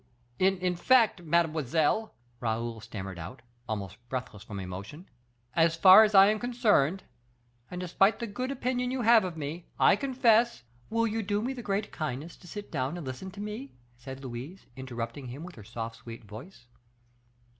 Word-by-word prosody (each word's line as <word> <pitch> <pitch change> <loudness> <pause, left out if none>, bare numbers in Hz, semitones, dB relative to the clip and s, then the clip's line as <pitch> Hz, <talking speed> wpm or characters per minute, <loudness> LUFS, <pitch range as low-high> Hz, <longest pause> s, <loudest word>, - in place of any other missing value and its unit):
"In 185 -1 +2
fact, 225 0 +4
mademoiselle," 165 - +1 0.2
Raoul 115 0 -2
stammered 95 -4 -7
out, 95 +11 -9 0.3
almost 105 -2 -4
breathless 125 -6 -5
from 100 -1 -7
emotion, 95 - -8 0.5
"as 165 0 +4
far 190 +5 +9
as 210 -1 +1
I 195 0 +10
am 215 - -1
concerned, 210 - +2 0.7
and 180 - -6
despite 190 +4 +2
the 235 - -4
good 250 +4 -4
opinion 250 -2 -1
you 255 -1 -2
have 230 -1 +6
of 180 -3 -5
me, 155 +3 -5
I - - +6
confess 240 -2 +2
" 120 0 -31
"Will 230 +1 +1
you 225 0 -1
do 205 0 -1
me 250 +5 -2
the 250 - -7
great 205 -1 -2
kindness 155 +2 -4
to 180 - -16
sit 205 +3 -8
down 140 +2 -2
and 170 - -7
listen 130 +9 -6
to 200 +2 -12
me?" 210 +6 -6 0.2
said 130 +2 -9
Louise, 130 +9 -7
interrupting 125 0 -6
him 130 +6 -7
with 180 +1 -9
her 110 - -12
soft, 115 +1 -6
sweet 115 -1 -10
voice. 120 - -12
170 Hz, 175 wpm, -29 LUFS, -, 0.7 s, I